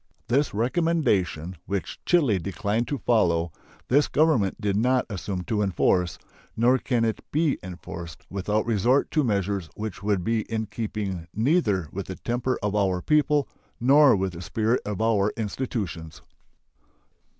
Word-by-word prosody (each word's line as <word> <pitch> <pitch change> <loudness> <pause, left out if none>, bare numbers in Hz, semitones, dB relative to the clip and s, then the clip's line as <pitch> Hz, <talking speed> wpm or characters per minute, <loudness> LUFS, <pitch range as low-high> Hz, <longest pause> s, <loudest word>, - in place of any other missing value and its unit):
This 140 +4 +2
recommendation, 105 - 0
which 100 -1 -4
Chile 140 - +3
declined 100 +6 -2
to 145 - -2
follow, 85 -10 +2 0.4
this 145 +4 +3
Government 145 - +2
did 100 -1 0
not 125 +4 +2
assume 90 0 -4
to 105 +2 -1
enforce; 90 -2 +1 0.4
nor 125 +3 +4
can 120 -3 0
it 110 -2 -2
be 155 -1 +1
enforced 85 -2 -8
without 105 +3 -1
resort 120 +4 +2
to 155 - +2
measures 100 - -1
which 105 -2 -5
would 100 -3 0
be 115 +3 +1
in 110 -1 -1
keeping 100 -5 -4
neither 110 - +2
with 100 0 -5
the 95 - -5
temper 120 +4 -2
of 105 0 0
our 95 -3 +1
people 150 -2 +2 0.3
nor 135 +1 +6
with 95 -1 -1
the 85 - -8
spirit 110 +8 0
of 105 +1 -2
our 105 -2 +2
institutions. 105 -7 -4
105 Hz, 145 wpm, -25 LUFS, 95-125 Hz, 0.4 s, nor